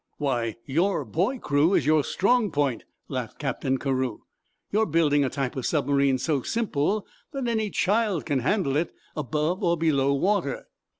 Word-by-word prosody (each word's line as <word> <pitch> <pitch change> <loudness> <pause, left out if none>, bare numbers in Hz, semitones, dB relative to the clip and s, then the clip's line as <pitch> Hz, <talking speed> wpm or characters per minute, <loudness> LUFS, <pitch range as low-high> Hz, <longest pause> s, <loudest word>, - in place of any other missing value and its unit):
"Why, 120 -6 -1
your 165 +2 +1
boy 185 - 0
crew 150 - +2
is - - +2
your 155 0 +4
strong 220 - +2
point," 140 -7 -1 0.2
laughed - - -5
Captain 135 0 -1
Carew. 130 -4 -2 0.5
"You're 220 +2 +2
building 150 -3 +3
a 135 - 0
type 135 -2 -3
of 130 - -2
submarine 140 -3 +2
so 140 +1 0
simple 205 - -1 0.3
that 270 -3 -2
any 220 -2 0
child 205 -3 +1
can 145 -4 0
handle 140 - 0
it 165 +2 -1 0.2
above 150 - -1
or 170 -1 +2
below 140 -4 +2
water." 180 -1 0
150 Hz, 160 wpm, -26 LUFS, 135-195 Hz, 0.5 s, your